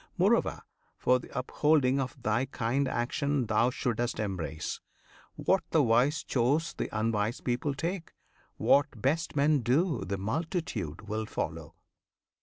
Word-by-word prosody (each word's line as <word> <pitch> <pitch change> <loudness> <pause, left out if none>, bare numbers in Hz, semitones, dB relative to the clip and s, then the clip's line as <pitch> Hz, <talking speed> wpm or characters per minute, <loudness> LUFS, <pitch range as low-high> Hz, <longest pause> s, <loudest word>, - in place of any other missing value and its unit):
Moreover, - - +2 0.4
for 125 0 +3
the - - -12
upholding 135 +1 +2
of 130 0 -3
thy 110 +4 +1
kind, 130 +1 -1
Action 135 +2 0
thou 110 +3 +3
should'st 120 -1 -2
embrace. 90 -7 -3 0.5
What 190 - +1
the 160 -3 +4
wise 125 +6 +3
choose 140 +7 +1
The - - -3
unwise 110 +1 0
people 130 +3 -1
take; 170 +4 -4 0.4
what 140 -4 +3
best 155 +9 0
men 145 +1 +4
do 135 +4 +1
The 100 - -3
multitude 110 - -3
will 110 +1 -2
follow. 80 -4 -4
125 Hz, 130 wpm, -30 LUFS, 110-145 Hz, 0.5 s, the